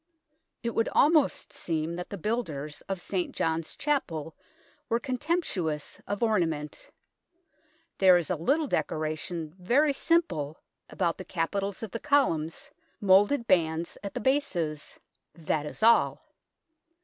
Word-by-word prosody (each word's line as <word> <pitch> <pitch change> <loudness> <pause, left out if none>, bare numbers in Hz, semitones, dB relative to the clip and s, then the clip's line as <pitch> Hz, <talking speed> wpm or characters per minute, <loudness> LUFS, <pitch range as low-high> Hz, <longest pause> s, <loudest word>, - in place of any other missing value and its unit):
It 235 - -1
would 225 - +1
almost 300 -1 +3
seem 165 0 -2
that 180 - -6
the 200 - -5
builders 155 - -3
of 195 -2 -2
St. 180 0 -3
John's 160 0 -1
Chapel 180 - -2 0.5
were 230 - +2
contemptuous 255 - -2
of 205 +2 -2
ornament. 165 -9 -1 1.1
There 185 -2 +7
is, 175 0 -2
a - - +2
little 275 - +1
decoration, 155 - -2
very 275 +11 +3
simple, 270 - +1 0.3
about 170 -3 -1
the - - -5
capitals 195 +4 -2
of 220 - -5
the 230 - -4
columns, 220 - +1 0.3
moulded 205 +6 +4
bands 165 -3 +1
at 200 - -6
the - - -2
bases 175 - -1 0.4
that 155 -2 -2
is 215 - -7
all. 230 +1 +4
185 Hz, 125 wpm, -28 LUFS, 160-235 Hz, 1.1 s, There